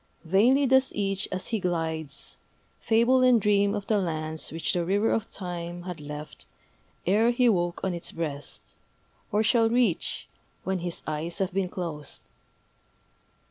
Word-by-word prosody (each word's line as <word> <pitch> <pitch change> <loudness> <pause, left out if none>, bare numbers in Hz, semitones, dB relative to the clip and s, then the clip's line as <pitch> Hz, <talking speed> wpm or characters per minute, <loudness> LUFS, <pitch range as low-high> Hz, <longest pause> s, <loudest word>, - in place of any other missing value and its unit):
Vainly 235 - +4
does 265 0 +4
each, 195 -1 +1
as 185 0 -2
he 225 - 0
glides, 160 -5 -3 0.4
Fable 235 +3 +3
and 250 -2 +6
dream 205 -1 +3
Of 205 - -4
the 210 -2 +2
lands 155 -2 -3
which 165 +4 0
the 175 -2 +1
River 200 +5 +2
of 220 - -1
Time 175 -2 -5
Had 180 -4 -6
left 150 +1 -8 0.6
ere 215 +6 +4
he 245 +1 +3
woke 175 -5 +1
on 190 - 0
its 170 - -4
breast, 145 -3 -6 0.5
Or 210 +1 +2
shall 225 0 +4
reach 230 -7 0 0.4
when 190 -1 -1
his 175 0 -4
eyes 155 +2 -3
have 190 -2 -1
been 190 -1 0
closed. 160 -6 -4
185 Hz, 150 wpm, -27 LUFS, 165-220 Hz, 0.6 s, and